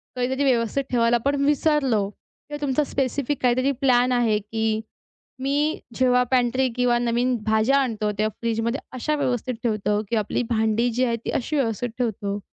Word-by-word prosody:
कधीतरी 260 +3 -1
व्यवस्थित 255 +1 +1
ठेवायला 235 -1 +3
आपण 280 +5 0
विसरलो 275 -8 +2
किंवा 295 +7 -12
तुमचा 285 +1 +1
स्पेसिफिक 275 +1 -2
काहीतरी 255 +2 +2
प्लॅन 250 -1 +3
आहे, 235 -4 +2
की 220 +1 -2 0.6
मी 290 +3 0 0.2
जेव्हा 250 -1 +3
पॅन्ट्री 255 +1 +2
किंवा 250 -1 +2
नवीन 240 +1 +1
भाज्या 220 +5 +3
आणतो, 220 -6 0
तेव्हा 215 +1 +1
फ्रीजमध्ये 230 +2 -1
अशा 300 +5 -1
व्यवस्थित 255 -3 -1
ठेवतो, 210 -2 0
की 235 - 0
आपली 215 +3 0
भांडी 220 +1 +1
जी 255 +2 +1
आहे 235 -1 0
ती - - -1
अशी 300 +5 -2
व्यवस्थित 245 -2 0
ठेवतो? 205 -3 -2
245 Hz, 160 wpm, -23 LUFS, 225-265 Hz, 0.6 s, ठेवायला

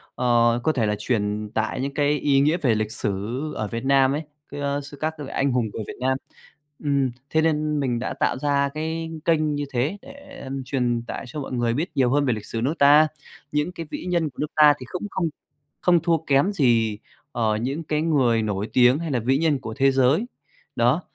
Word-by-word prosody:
ờ, 120 -1 +3
có 155 - +3
thể 125 -7 0
là 105 0 0
truyền 105 -2 -1
tải 110 +3 -1
những 140 +1 -3
cái 145 0 +1
ý 140 -2 +3
nghĩa 150 +4 +3
về 130 -10 +2
lịch 110 0 -2
sử 105 - -1 0.4
ở 110 - -2
Việt 115 +4 -5
Nam 135 -1 +4
ấy, 150 +3 -2 0.3
ơ, 140 0 -2
sư 140 +1 -10
các 155 +1 0
vị 145 - -6
anh 140 0 +1
hùng 120 -3 0
người 110 - -4
Việt - - -6
Nam. 130 +1 +1 0.7
Ừm, 140 -3 +1 0.2
thế 160 - +2
nên 155 -1 +1
mình 125 -4 0
đã 125 - -3
tạo - - +1
ra 140 0 +1
cái 160 +1 -3
kênh 155 -2 +2
như 145 0 -2
thế 135 +11 0
để, 280 +1 -12
ừm, 135 0 -5
truyền 125 -3 -1
tải - - -5
cho 140 +5 -6
mọi 135 - -7
người 120 -2 0
biết 155 +8 -2
nhiều 130 -3 +3
hơn 145 +1 +2
về 125 - +2
lịch 105 -2 -6
sử 115 - -4
nước 135 +6 +1
ta. 145 +2 +7 0.4
Những 150 +4 0
cái 170 -2 -7
vĩ - - -5
nhân 170 -3 0
của 130 - -25
nước 150 - -2
ta 150 -1 +7
thì 130 - -8
cũng 180 +3 -4
không 170 -3 -1 0.5
không 175 -1 +4
thua 165 0 +2
kém 140 +8 +3
gì, 115 - +2 0.3
ờ, 110 -4 0
những 135 +8 -3
cái 150 -1 -1
người 130 -8 +2
nổi 105 0 -2
tiếng 125 +3 +5
hay 165 -2 -4
là 125 - +1
vĩ 130 +4 +1
nhân 155 -2 +1
của 110 -2 -6
thế 135 +1 +3
giới. 135 - +3 0.5
Đó, 125 +8 +2
140 Hz, 225 wpm, -23 LUFS, 120-155 Hz, 0.7 s, ta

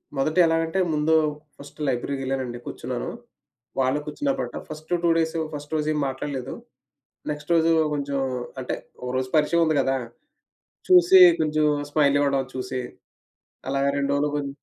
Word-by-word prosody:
మొదట 155 +5 -1
ఎలాగంటే, 165 +3 0
ముందు 150 +2 +1 0.4
ఫస్ట్ 145 +2 -14
లైబ్రరీకెళ్ళానండి. 130 -1 -2
కూర్చున్నాను. 125 0 -5 0.7
వాళ్ళు 130 +3 +2
కూర్చున్నప్పుడు 275 - -3
ఫస్ట్ 155 +2 -10
2 170 - +3
డేసు 160 0 0
ఫస్ట్ 145 +1 -7
రోజు 150 0 -1
ఏం 150 - -1
మాట్లాడలేదు. 135 -1 -4 0.8
నెక్స్ట్ 150 +3 -6
రోజు 165 0 +3 0.2
కొంచెం 140 -1 -2 0.4
అంటే, 125 - -3 0.3
ఒకరోజు 130 +1 -2
పరిచయం 160 +3 +3
ఉంది 155 -2 +1
గదా! 135 0 0 0.9
చూసి 365 +1 +7 0.2
కొంచెం 155 0 +1 0.3
స్మైల్ 145 -2 +3
ఇవ్వడం 140 -2 +1
చూసి, 130 0 -3 0.9
అలాగ 140 0 0
2 140 0 0
రోజులు 145 +1 0
గొం 145 -1 -2
145 Hz, 130 wpm, -24 LUFS, 135-155 Hz, 0.9 s, చూసి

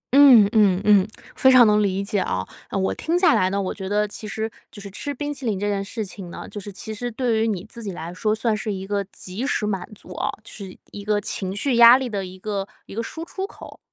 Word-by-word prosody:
嗯， 255 -8 +8
嗯 200 -4 +4
嗯， 205 -2 +5 0.3
非 260 - +5
常 250 -2 +8
能 210 0 +4
理 195 -1 0
解 200 0 -1
啊， 95 - -2 0.2
我 190 -1 0
听 335 +2 -1
下 355 -3 +5
来 185 - +3
呢， 200 +1 -1
我 190 - -2
觉 190 -1 -6
得 210 0 +1
其 210 +1 -8
实 220 +2 -3 0.2
就 205 - -11
是 200 -1 -9
吃 285 +8 -5
冰 290 +2 -4
淇 270 -1 -10
淋 210 -5 -1
这 205 - -1
件 200 -1 -1
事 215 +1 -4
情 185 -1 -9
呢， - - -8
就 205 - -7
是 205 - -8
其 220 +3 -7
实 245 +3 -4
对 230 -2 0
于 225 - +2
你 195 -4 -2
自 235 - -10
己 200 -3 -4
来 170 +1 -7
说， 215 +3 0
算 220 0 0
是 215 0 -3
一 190 -1 -5
个 200 0 -1
及 200 +6 -6
时 210 - 0
满 195 -3 -3
足 - - -11
啊， - - -2
就 - - -11
是 195 -3 -9
一 205 - -8
个 210 0 +1
情 190 -1 -4
绪 245 +2 0
压 235 +2 +9
力 260 -1 -3
的 200 -2 -3
一 185 +1 -11
个 200 0 -3 0.2
一 - - -11
个 230 - -2
输 320 +8 -6
出 385 +3 -5
口。 - - -13
210 Hz, 285 characters per minute, -23 LUFS, 195-235 Hz, 0.3 s, 压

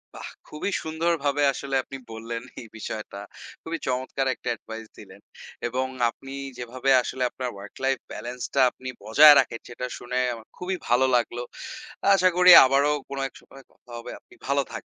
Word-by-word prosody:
বাহ! - - -7 0.2
খুবই 150 +6 -4
সুন্দরভাবে 160 -3 0
আসলে 135 0 -4
আপনি 135 - -9
বললেন 115 +1 -6 0.2
এই 115 - -11
বিষয়টা। 110 -2 -6 0.4
খুবই 165 0 -4
চমৎকার 130 +1 -1
একটা 120 - -6
এডভাইস 110 0 -9
দিলেন - - -14 0.5
এবং 130 +2 -1 0.2
আপনি 135 +3 -11 0.2
যেভাবে 125 +2 -3
আসলে 130 +1 -3
আপনার 125 0 -5
ওয়ার্ক 100 0 -11
লাইফ 135 -1 +1
ব্যালেন্স 125 +1 -7
টা 135 - +3
আপনি 130 - -8
বজায় 145 +8 +8
রাখেন 115 - -1
সেটা 125 +1 -5
শুনে 125 +1 -5 0.2
আমার 115 -1 -11
খুবই 185 +1 -3
ভালো 125 +2 +4
লাগলো। 120 0 0 0.7
আশা 185 -1 +4
করি 180 0 +8
আবারও 140 +3 +3 0.2
কোনো 140 0 -4
এক - - -37
সময় 135 0 -16
কথা - - -29
হবে। 115 - -8
আপনি - - -22
ভালো - - +2
থাকবেন। - - -6
130 Hz, 170 wpm, -25 LUFS, 120-140 Hz, 0.7 s, বজায়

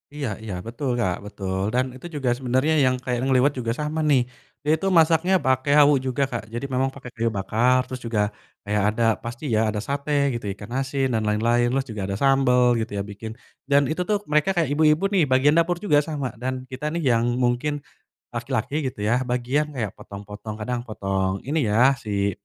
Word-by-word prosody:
Iya 145 -2 -3 0.2
iya 105 -3 -5
betul 125 +4 -3
Kak 90 -5 +1
betul 95 -1 -3
dan 130 +1 +2
itu 130 - -9
juga 135 -4 -1
sebenernya 130 +4 +1
yang 130 0 +3
kayak 125 -1 -3
ngeliwet 135 +2 +4
juga 115 -1 -1
sama 150 +1 -2
nih, 135 -4 +5 0.4
dia 150 - +3
itu 195 - -2
masaknya 165 +3 +4
pake 130 +1 +1
hawu 145 0 +7
juga 130 +1 -1
Kak 120 -4 -3
jadi 120 +3 -3
memang 130 +1 +1
pake 135 -2 -10
kayu 115 0 0
bakar 120 +6 +2
terus 130 -1 -7
juga, 115 -3 0 0.4
kayak 105 0 0
ada 115 +2 -1 0.2
pasti 120 +4 -7
ya 110 - +3
ada 105 - -3
sate 140 +1 -3 0.2
gitu 115 -3 -5
ikan 110 +3 -10
asin 135 -1 -1
dan 110 - +1
lain-lain 120 +3 +2
terus 135 +2 0
juga 105 -2 -5
ada 100 - -2
sambel 135 -1 +3 0.2
gitu 110 - -4
ya - - 0
bikin, 105 +2 -8 0.4
dan 140 0 +5
itu 160 - -2
tuh 210 - +3
mereka 150 +5 +3
kayak 160 -5 +2
ibu-ibu 155 +4 +3
nih 185 -5 +4
bagian 130 +3 +4
dapur 170 +1 +2
juga 145 -5 +4
sama 145 -4 -4
dan 130 0 -3
kita 130 +4 -4
nih 170 - -1
yang 115 0 +2
mungkin, 125 +4 +1 0.6
laki-laki 145 - -3 0.2
gitu - - -9
ya 120 +5 +1
bagian 125 +5 0
kayak 110 -5 -2
potong-potong 105 +2 -8
kadang 120 +3 -3
potong 95 -2 -2
ini 145 0 0
ya 120 +6 +5
si 100 -2 -1
125 Hz, 200 wpm, -24 LUFS, 110-145 Hz, 0.6 s, hawu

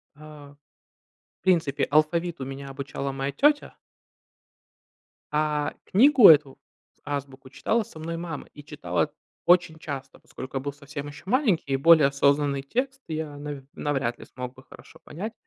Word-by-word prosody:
э, - - -23
в 150 -2 -13 0.9
принципе, 165 -7 +2
алфавиту 155 0 +1
меня 135 +1 -7
обучала 140 0 -5
моя 135 +1 -3
тетя 290 - +2 1.6
а 150 -1 0
книгу 255 +2 +7
эту 145 -4 +5 0.4
с - - -38
"Азбуку", 135 -2 -5
читала 225 - 0
со 160 - -13
мной 165 +1 -4
мама 165 -3 -6
и 145 - -12
читала 90 - -2 0.3
очень 175 -2 +4
часто, 135 -4 -7
поскольку 130 +1 -8
я 130 - -2
был 140 0 -4
совсем 145 0 -8
еще 145 - -11
маленький 205 - +1
и - - +3
более 155 0 +6
осознанный 140 0 +2
текст 265 - -2
я 155 -2 -4
навь 145 -2 -7
навряд 135 -5 -2
ли - - -10
смог 125 0 -7
бы 130 - -16
хорошо - - -16
понять. 210 +8 -6
145 Hz, 150 wpm, -26 LUFS, 140-165 Hz, 1.6 s, книгу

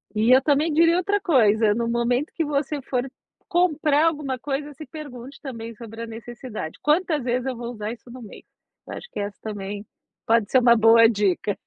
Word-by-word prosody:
e 220 +4 +3
eu 265 - +4
também 300 +2 +1
diria 335 +2 +4
outra 405 +3 +1
coisa, 220 - +3
no 230 +1 -2
momento 240 +4 0
que 330 - 0
você 290 0 -2
for 255 0 -2 0.4
comprar 315 -4 +2
alguma 290 -5 -2
coisa, 290 +2 -4
se 305 +3 -10
pergunte 275 -4 -10
também 230 -4 -7
sobre 225 0 -9
a - - -6
necessidade: 225 -5 -8
"Quantas 305 -2 +1
vezes 250 +1 -1
eu 260 -2 -2
vou 235 +1 -6
usar 215 -1 -5
isso 240 +1 -15
no 255 0 -10
mês?" 215 - -12 0.4
Eu - - -7
acho 485 - -10
que - - -6
essa 205 0 -4
também 205 -1 -6 0.4
pode 225 -2 +2
ser 260 - +6
uma 235 -1 +5
boa 225 0 +6
dica. 205 -2 0
245 Hz, 195 wpm, -23 LUFS, 225-295 Hz, 0.4 s, ser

